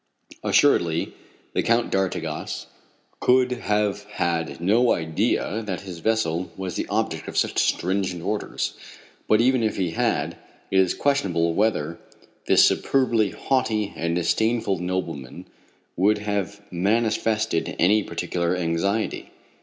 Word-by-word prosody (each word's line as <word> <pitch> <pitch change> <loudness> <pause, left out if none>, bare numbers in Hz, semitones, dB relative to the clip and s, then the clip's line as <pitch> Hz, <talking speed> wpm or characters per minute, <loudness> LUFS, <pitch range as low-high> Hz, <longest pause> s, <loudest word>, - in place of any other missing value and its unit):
Assuredly 85 -1 +3 0.4
the - - +1
Count 115 0 +1
d'Artigas 90 -5 -2 0.5
could 125 0 +3
have 105 -4 -1
had 85 -6 -2
no 110 +8 +3
idea 80 +6 -1
that 100 -4 -4
his 90 -4 -8
vessel 90 -4 0
was 95 -2 -4
the - - -2
object - - -2
of - - -5
such - - +1
stringent 90 -1 0
orders; 105 +3 -2 0.5
but 110 +1 +4
even 130 0 +3
if 110 -2 0
he 90 -4 0
had, - - -1 0.3
it 95 - +4
is 95 -2 +3
questionable 90 -12 +1
whether 85 -6 0 0.5
this - - +6
superbly 120 -6 +2
haughty 110 -6 -1
and 85 0 -1
disdainful 100 +3 +1
nobleman 85 -7 -4 0.5
would 100 +4 +3
have 100 -1 -3
manifested 110 0 0
any 105 +5 +4
particular 90 -2 -2
anxiety. 90 +5 -1
100 Hz, 120 wpm, -24 LUFS, 85-110 Hz, 0.5 s, this